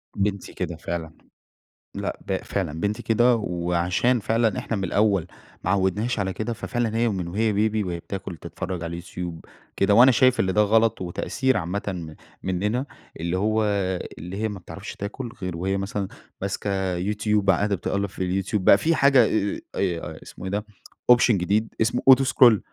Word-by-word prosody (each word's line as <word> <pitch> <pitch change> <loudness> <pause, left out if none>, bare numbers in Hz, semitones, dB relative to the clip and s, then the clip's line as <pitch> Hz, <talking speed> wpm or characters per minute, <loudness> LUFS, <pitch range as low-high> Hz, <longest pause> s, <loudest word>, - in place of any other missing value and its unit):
بنتي 100 -1 -2
كده - - -3
فعلًا، 80 -2 -5 0.8
لأ - - -3
ب - - 0
فعلًا 80 +2 -3
بنتي 105 +4 -1
كده، 120 +2 +4
وعشان 90 +5 0
فعلًا 110 +1 +1
إحنا 115 - -3
من 95 - -3
الأول 100 -2 +2 0.4
ما 90 - -1
عودنهاش 100 +4 +1
على 95 -1 -1
كده، 115 +2 -3
ففعلًا 115 -1 -2
هي 120 0 +2
ومن 95 -5 -2
هي 110 -1 +2
بيبي 110 +1 +1
وهي 85 -2 -3
بتاكل 95 -2 -6
تتفرج 90 +1 -5
على 85 +1 -5
الYoutube 85 -2 -6 0.4
كده، 100 +1 +3
وأنا 125 +4 +8
شايف 130 +1 +4
اللي 95 -1 +2
ده 105 - +4
غلط 110 0 +3
وتقصير 130 +8 0
عامةً 90 -2 -4 0.3
مننا، 105 +8 -1 0.3
اللي 85 +2 -1
هو 110 +2 +1 0.5
اللي 90 +5 -7
هي 110 - +1
ما 100 -2 -6
بتعرفش - - -9
تاكل 115 +4 -5
غير 90 -2 -3
وهي 95 +3 -1
مثلًا 100 0 -3 0.3
ماسكه 95 -2 -2
Youtube 105 -1 0
قاعدة 100 +2 +3
بتقلِّب 100 +3 -1
في 95 +1 -2
الYoutube 105 +2 -1
بقى 100 - +7
في 165 +6 +1
حاجة 135 -3 +6 0.5
آآ، 90 -4 -2
اسمه 95 - -10
إيه 95 - -3
ده 105 +1 -2 0.5
option 120 0 +6
جديد 100 +4 0
اسمه 115 +2 +1
auto 135 +1 +8
scroll 120 -4 +6
100 Hz, 170 wpm, -24 LUFS, 90-110 Hz, 0.8 s, وأنا